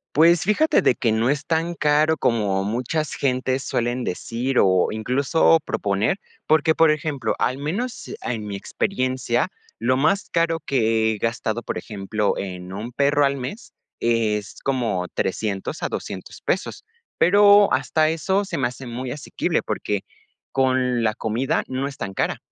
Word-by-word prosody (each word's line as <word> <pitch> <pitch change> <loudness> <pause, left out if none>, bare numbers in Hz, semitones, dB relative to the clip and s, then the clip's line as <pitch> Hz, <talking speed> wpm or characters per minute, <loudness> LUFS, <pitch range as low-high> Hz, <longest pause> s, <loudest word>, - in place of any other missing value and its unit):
Pues 165 +2 +5
fíjate 215 - +3
de - - +5
que 115 -2 0
no 115 +4 +2
es 145 0 -3
tan 165 +1 0
caro 155 0 +2
como 100 -6 +1
muchas 125 +9 -2
gentes 130 0 0
suelen 120 +1 -1
decir 120 +7 -2
o 95 -1 +3
incluso 135 +9 +3
proponer, 100 - 0 0.3
porque, 155 +1 +3
por 160 -1 +5
ejemplo, 145 -4 -1
al 130 +2 +1
menos, 205 - -4
ah, - - -3
en 105 -1 -6
mi 100 -1 -5
experiencia, 130 - -1 0.3
lo 130 +3 +2
más 195 +8 +1
caro 165 -1 +1
que 110 -4 +2
he - - -5
gastado, 115 +1 -2
por - - -3
ejemplo, 105 0 -2
en 90 -1 -6
un 110 +5 -5
perro 145 +2 +3
al 140 0 0
mes, 135 - -7 0.3
es 110 -3 0
como 115 -9 -1
$300 100 - -2
a - - -1
$200 - - -6
pesos. - - -2 0.3
Pero 205 +2 +6
hasta 155 +4 +2
eso 190 +5 0
se 165 - -4
me 120 - +2
hace 125 +2 -9
muy 125 +2 -5
asequible, 145 - -2
porque 105 -2 -2 0.5
con 130 -2 +1
la 110 -1 +1
comida 115 +4 -1
no 130 +2 -2
es 140 - -8
tan 95 - -5
cara. - - -1
130 Hz, 160 wpm, -23 LUFS, 110-155 Hz, 0.5 s, Pero